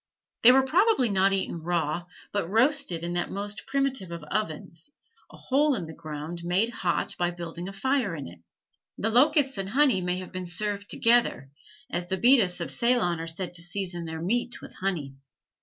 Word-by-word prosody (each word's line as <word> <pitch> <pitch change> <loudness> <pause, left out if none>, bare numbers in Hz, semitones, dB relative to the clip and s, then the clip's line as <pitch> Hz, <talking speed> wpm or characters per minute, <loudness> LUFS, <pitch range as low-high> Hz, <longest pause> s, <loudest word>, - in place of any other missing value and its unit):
They 240 - +9
were 265 +1 +5
probably 345 - +3
not 195 0 +3
eaten 190 -3 -2
raw, 170 0 -1 0.3
but 200 -5 -1
roasted 230 - +1
in 175 0 -3
that 175 0 -1
most 205 +1 -5
primitive 270 -8 -1
of 170 -2 -6
ovens, 160 - -4 0.4
a - - -13
hole 285 +2 +2
in 190 -7 -4
the 160 - -9
ground 155 +1 -6
made 185 +6 +1
hot 180 -7 -1
by 175 0 +2
building 175 0 -6
a - - -6
fire 240 -2 0
in 145 - -6
it. 85 0 -13 0.6
The 225 - 0
locusts 275 +1 +3
and 195 0 -2
honey 260 -4 +3
may 180 0 -1
have 185 0 -7
been 185 -1 -5
served 205 +3 -3
together, 230 - +2 0.4
as 175 0 -2
the 190 +1 -1
Bedas 230 -7 +4
of 170 - -2
Ceylon 235 -9 +1
are 165 - -5
said 175 +2 -4
to 175 - -2
season 175 -1 -3
their 160 0 -5
meat 240 +6 0
with - - -11
honey. 170 -8 -3
190 Hz, 190 wpm, -27 LUFS, 170-240 Hz, 0.6 s, They